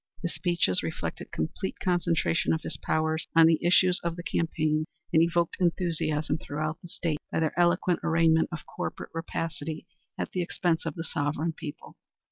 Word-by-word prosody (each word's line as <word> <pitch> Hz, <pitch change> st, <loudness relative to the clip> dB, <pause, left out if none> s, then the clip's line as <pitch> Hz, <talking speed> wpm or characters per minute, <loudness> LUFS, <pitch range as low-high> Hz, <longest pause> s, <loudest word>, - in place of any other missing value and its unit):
His 175 Hz, -, -1 dB
speeches 170 Hz, -, +1 dB
reflected 85 Hz, -1 st, -4 dB
complete 80 Hz, -, -3 dB
concentration 175 Hz, -2 st, +1 dB
of 160 Hz, -, -2 dB
his -, -, -3 dB
powers 160 Hz, 0 st, 0 dB
on 165 Hz, -1 st, +8 dB
the 160 Hz, 0 st, +4 dB
issues 180 Hz, +1 st, +5 dB
of 170 Hz, -1 st, -2 dB
the 175 Hz, -, -7 dB
campaign 155 Hz, -2 st, 0 dB, 0.3 s
and 160 Hz, -, +6 dB
evoked 170 Hz, 0 st, +1 dB
enthusiasm 165 Hz, -4 st, 0 dB
throughout 155 Hz, +2 st, -3 dB
the 175 Hz, -, -10 dB
State 160 Hz, -3 st, -2 dB
by -, -, 0 dB
their 160 Hz, -1 st, +1 dB
eloquent 175 Hz, 0 st, +3 dB
arraignment 165 Hz, -1 st, +3 dB
of 170 Hz, -, -6 dB
corporate -, -, -5 dB
rapacity 165 Hz, -2 st, -4 dB, 0.3 s
at -, -, -3 dB
the 185 Hz, -, -1 dB
expense 170 Hz, -1 st, 0 dB
of 150 Hz, -, -3 dB
the 165 Hz, -, -4 dB
sovereign 150 Hz, +2 st, -1 dB
people. 150 Hz, -1 st, -9 dB
165 Hz, 165 wpm, -28 LUFS, 155-175 Hz, 0.3 s, on